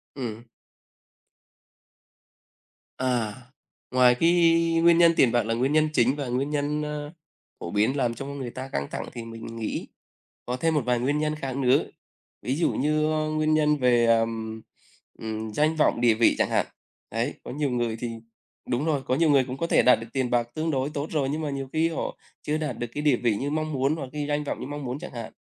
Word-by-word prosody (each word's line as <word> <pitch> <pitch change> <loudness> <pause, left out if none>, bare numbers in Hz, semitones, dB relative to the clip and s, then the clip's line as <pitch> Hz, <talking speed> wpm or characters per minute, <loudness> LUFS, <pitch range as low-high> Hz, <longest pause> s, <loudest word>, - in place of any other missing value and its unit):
Ừm. 120 -3 -5 2.5
À, 120 -5 0 0.6
ngoài 125 -1 +5
cái 165 +6 +3 0.5
nguyên 170 0 +6
nhân 170 -1 +7
tiền 120 - +4
bạc 120 -2 +2
là 115 +1 -1
nguyên 130 +4 0
nhân 155 0 +3
chính 125 +2 +3
và 140 -3 -4
nguyên 130 +4 -1
nhân, 150 0 -1
ờ, 150 +1 -5 0.5
phổ 85 - -6
biến 110 +7 +1
làm 120 -3 +1
cho 135 +4 -7
người 140 -3 -5
ta 130 +1 -6
căng 70 - -3
thẳng - - -4
thì 115 - -6
mình 115 0 -9
nghĩ 110 - -3 0.6
có 125 +1 -2
thêm 165 +2 +1
một 150 - +3
vài 125 -1 +1
nguyên 140 +4 0
nhân 155 0 0
khác 135 -4 -5
nữa, 130 0 +3 0.6
ví 130 - -1
dụ 165 - +1
như 155 +2 +1 0.3
nguyên 155 0 +2
nhân 150 -1 +3
về, 120 -2 +3
ờ, 115 0 +5 1.0
ừm, 110 0 -4
danh 155 +6 +2
vọng, 150 -5 +2
địa 120 -2 +5
vị 115 +1 +3
chẳng - - +1
hạn. - - +1 0.5
Đấy, - - -1
có - - -7
nhiều 145 0 -1
người 120 -2 -1
thì 120 - -3 0.6
đúng 125 +5 0
rồi, 150 -4 +1
có 130 - +1
nhiều 165 +1 +3
người 140 -3 +5
cũng 130 +1 -6
có 170 - -1
thể - - +4
đạt 125 -2 +6
được 115 - -8
tiền 130 -2 0
bạc 120 -1 +1
tương 160 +1 -1
đối 135 +1 0
tốt 150 0 -4
rồi, 145 -4 0
nhưng 150 +3 -2
mà 150 - -2
nhiều 135 -1 -4
khi 160 +1 +2
họ 165 - -4 0.3
chưa 150 +1 -1
đạt 150 -7 -3
được 120 - -3
cái 145 - -3
địa 145 -4 +4
vị 115 -3 +1
như 140 - -2
mong 155 0 -2
muốn 135 +3 +1
hoặc 135 -5 -6
cái 150 -1 -3
danh 150 0 0
vọng - - -4
như - - -5
mong 145 0 -6
muốn 125 +3 -4
chẳng - - -8
hạn, 115 -2 -7
135 Hz, 220 wpm, -26 LUFS, 120-150 Hz, 2.5 s, nhân